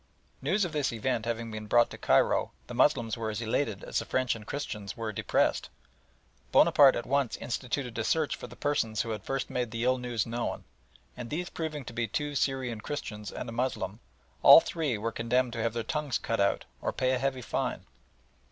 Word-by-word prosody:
News 185 +8 +2
of 175 - -4
this 150 -3 0
event 115 0 -1
having 115 -1 -3
been 110 0 -6
brought 120 +2 +4
to - - -7
Cairo, - - +3
the - - -8
Moslems 120 -3 +2
were 115 -1 -2
as 105 - -3
elated 110 -2 -1
as - - -1
the - - -5
French 130 -1 +1
and 110 -1 -11
Christians 105 -8 -5
were 110 -2 -3
depressed. - - +1 0.8
Bonaparte 140 -2 +7
at 120 - -3
once 140 -3 0
instituted 125 0 -3
a - - 0
search 155 +6 +1
for - - -8
the 120 - -12
persons 115 -7 0
who 115 - -4
had 110 - -4
first 135 0 -3
made 125 -2 -1
the 115 +1 -3
ill 130 +1 +2
news 120 -3 -1
known, 120 +1 -3 0.5
and 120 -2 -7
these 175 +4 -3
proving 155 -4 -4
to 115 - -8
be 115 0 -1
two 145 +6 -2
Syrian 130 -5 -1
Christians 105 -8 -5
and - - -6
a - - -5
Moslem, 115 -4 -2 0.4
all - - +11
three 155 -8 -2
were 115 +2 -2
condemned 120 +2 0
to 115 - -3
have 115 0 0
their 115 -1 -2
tongues 150 +2 -1
cut 115 - -2
out 100 0 +2 0.2
or - - -1
pay 130 0 0
a 130 - +1
heavy 130 -1 -1
fine. - - -2
120 Hz, 205 wpm, -29 LUFS, 115-135 Hz, 0.8 s, all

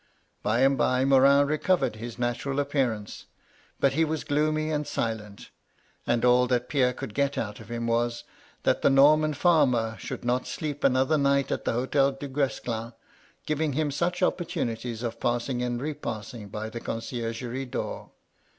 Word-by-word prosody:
By 115 +4 +1
and 135 0 +4
by 125 +2 +2
Morin 140 +1 +6
recovered 155 -1 +1
his 115 +1 -7
natural 125 +3 -1
appearance; 130 -7 -2 0.5
but 135 - +3
he 160 +4 +2
was 160 -1 -2
gloomy 155 +1 0
and 150 -1 -1
silent; 105 -3 -4 0.6
and 120 0 +2
all 125 0 +5
that 125 0 0
Pierre 130 -4 +3
could 110 - -7
get 140 +2 0
out 105 -2 -3
of 115 -1 -12
him 120 0 -3
was, 120 0 0 0.4
that - - +2
the - - +5
Norman 150 +3 +5
farmer 130 -9 +3
should - - -6
not 125 +1 0
sleep 145 -2 -4
another 130 +4 +3
night 140 -1 +2
at - - -2
the - - +1
Hotel 135 +3 +2
Dugues 135 0 -2
clin, 115 0 -4 0.5
giving 155 -1 0
him 150 +1 0
such 175 +5 -1
opportunities 120 -10 -2
of 115 -1 -4
passing 120 +1 -1
and 120 -1 -1
repassing 120 -6 -5
by 110 +2 -5
the 120 - -5
conciergerie 120 +2 -4
door. - - -4
130 Hz, 160 wpm, -27 LUFS, 120-145 Hz, 0.6 s, Morin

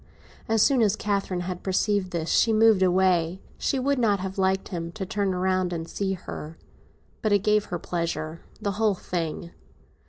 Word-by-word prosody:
As 225 -1 +4
soon 270 -4 +4
as 210 -2 +3
Catherine 200 -4 -1
had 180 0 -5
perceived 195 0 0
this 170 -3 -2
she 230 - +4
moved 220 -2 +5
away; 180 -1 +2 0.2
she 275 - 0
would 275 +1 +1
not 210 -4 +2
have 190 +1 -5
liked 190 0 +1
him 170 -2 -4
to 195 0 -4
turn 200 0 -1
round 185 0 +1
and 165 -1 -4
see 195 +2 -2
her. 165 -3 -7 0.6
But 215 -3 +1
it 200 -1 +3
gave 210 0 +3
her 175 - -3
pleasure—the 170 +4 -4
whole 210 0 +1
thing. 170 -1 -4
190 Hz, 175 wpm, -26 LUFS, 175-210 Hz, 0.6 s, moved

